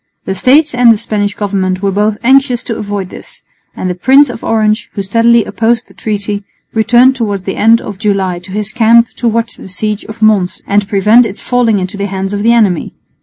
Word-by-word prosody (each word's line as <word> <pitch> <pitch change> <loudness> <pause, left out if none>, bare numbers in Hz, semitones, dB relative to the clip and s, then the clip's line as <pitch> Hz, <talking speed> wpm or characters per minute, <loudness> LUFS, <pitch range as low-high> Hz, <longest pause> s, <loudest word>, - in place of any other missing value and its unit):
The 190 - -2
States 280 - +2
and 245 -1 +5
the 225 - +2
Spanish 210 -2 -2
Government 190 -2 -2
were 200 - +1
both 210 +2 0
anxious 260 -1 +2
to 230 - -4
avoid 205 -3 -5
this; - - -12 0.3
and - - -4
the 180 - -1
Prince 265 +8 +3
of 230 - -10
Orange, 220 +1 0
who 200 - -4
steadily 230 +3 +2
opposed 230 0 -1
the - - -19
treaty, 205 -1 -4 0.3
returned 240 +4 +3
towards 205 -6 -3
the 190 - -4
end 225 +2 +3
of 205 -2 -8
July 195 -4 -1
to 185 +2 -12
his 210 +1 -2
camp 235 0 +3
to 240 - -1
watch 230 +1 -1
the - - -11
siege 210 +3 -2
of 220 0 -7
Mons 205 -4 +2
and 200 0 0
prevent 215 +4 +4
its 200 - -9
falling 245 -4 +1
into 185 +1 -4
the 200 0 -2
hands 195 0 -4
of 205 - -2
the 230 +2 +3
enemy. 210 -8 +1
215 Hz, 215 wpm, -12 LUFS, 200-230 Hz, 0.3 s, and